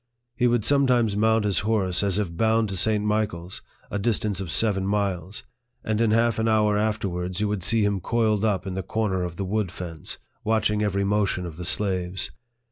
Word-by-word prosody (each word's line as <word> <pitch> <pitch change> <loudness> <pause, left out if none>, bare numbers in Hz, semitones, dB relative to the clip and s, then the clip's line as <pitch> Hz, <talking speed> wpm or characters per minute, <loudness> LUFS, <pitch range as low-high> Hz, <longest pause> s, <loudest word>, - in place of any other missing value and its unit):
He 125 - +2
would 120 -3 +1
sometimes 125 -7 +3
mount 110 +1 +2
his 100 -4 +1
horse, 100 -4 0
as 100 -2 +1
if 95 -5 -2
bound 110 +1 +2
to 95 - -3
St. 105 +2 +2
Michael's, 105 -4 -2 0.3
a 105 - -1
distance 105 -2 0
of 95 - -5
seven 100 0 +2
miles, 100 -2 -2 0.4
and 110 0 0
in 115 - +3
half 115 +1 +2
an 110 - +1
hour 105 -1 +3
afterwards 95 -4 -1
you 105 - +1
would 105 -2 -2
see 110 +2 +2
him 100 -1 0
coiled 110 +1 +1
up 100 -5 +1
in 95 - -4
the 95 - -2
corner 100 -3 -1
of 90 -1 -4
the 95 - -3
wood 100 -2 -1
fence, 85 -4 -7 0.3
watch 110 -1 +2
ing 105 0 0
every 100 -1 0
motion 100 -2 0
of 85 -3 -7
the 90 +1 -6
slaves. 95 -1 -1
105 Hz, 205 wpm, -25 LUFS, 95-110 Hz, 0.4 s, sometimes